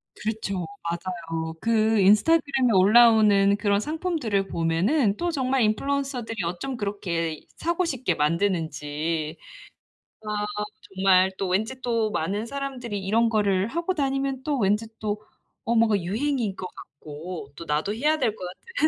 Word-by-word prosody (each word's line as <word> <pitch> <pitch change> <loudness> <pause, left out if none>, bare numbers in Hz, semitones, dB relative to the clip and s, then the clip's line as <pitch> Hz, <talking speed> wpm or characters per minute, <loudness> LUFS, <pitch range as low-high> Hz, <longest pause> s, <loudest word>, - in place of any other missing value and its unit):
그렇죠. 210 -5 -3 0.2
맞아요. 165 -2 -4
그 220 -1 +2
인스타그램에 265 - +4
올라오는 205 -1 +6
그런 205 -1 +2
상품들을 300 - -1
보면은 195 - +1
또 350 0 -1
정말 265 -3 +1
인플루언서들이 250 0 -1
어쩜 180 +10 -4
그렇게 170 -7 -3 0.2
사고 340 +2 0
싶게 255 - -1
만드는지. 160 -2 -1 0.8
아 210 -1 -2 0.5
정말 190 0 +4
또 195 - -2
왠지 220 +8 -1
또 230 -3 0
많은 205 +5 -2
사람들이 265 -5 -4
이런 225 +4 +3
거를 200 -3 +1
하고 340 +7 -1
다니면 270 -2 -1
또 290 -2 0
왠지 210 +1 +1
또 210 -1 -2 0.4
어 235 - +1
뭔가 225 -2 +4
유행인 225 +2 -1
것 185 - -5
같고 150 +1 -9
또 170 - -8
나도 155 +6 -1
해야 300 +6 +2
될 225 -5 +1
것 185 - -10
같은 330 - -11
210 Hz, 295 characters per minute, -25 LUFS, 185-255 Hz, 0.8 s, 올라오는